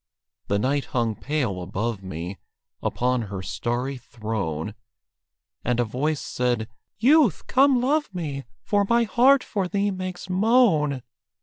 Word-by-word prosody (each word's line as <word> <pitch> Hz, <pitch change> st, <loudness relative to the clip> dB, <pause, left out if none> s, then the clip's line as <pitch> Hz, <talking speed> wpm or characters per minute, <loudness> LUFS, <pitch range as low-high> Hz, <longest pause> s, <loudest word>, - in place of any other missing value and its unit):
The 100 Hz, -, +1 dB
night 135 Hz, +6 st, 0 dB
hung 115 Hz, -2 st, +2 dB
pale 125 Hz, -11 st, -2 dB
above 105 Hz, +4 st, -3 dB
me 90 Hz, +1 st, -6 dB, 0.4 s
Upon 125 Hz, 0 st, 0 dB
her 95 Hz, -2 st, -5 dB
starry 125 Hz, +7 st, -2 dB
throne, 105 Hz, -7 st, -4 dB, 0.9 s
And 125 Hz, 0 st, 0 dB
a -, -, +4 dB
voice 140 Hz, +6 st, -1 dB
said, 120 Hz, -3 st, -1 dB, 0.3 s
"Youth, 255 Hz, -, +4 dB
come 270 Hz, -1 st, +4 dB
love 295 Hz, +3 st, +1 dB
me! 150 Hz, -7 st, -4 dB, 0.2 s
For 205 Hz, -1 st, +2 dB
my 235 Hz, 0 st, +4 dB
heart 250 Hz, +5 st, +4 dB
for 195 Hz, -4 st, -2 dB
thee 200 Hz, +2 st, 0 dB
makes 185 Hz, -1 st, -5 dB
moan." 185 Hz, -, +3 dB
140 Hz, 130 wpm, -25 LUFS, -, 0.9 s, a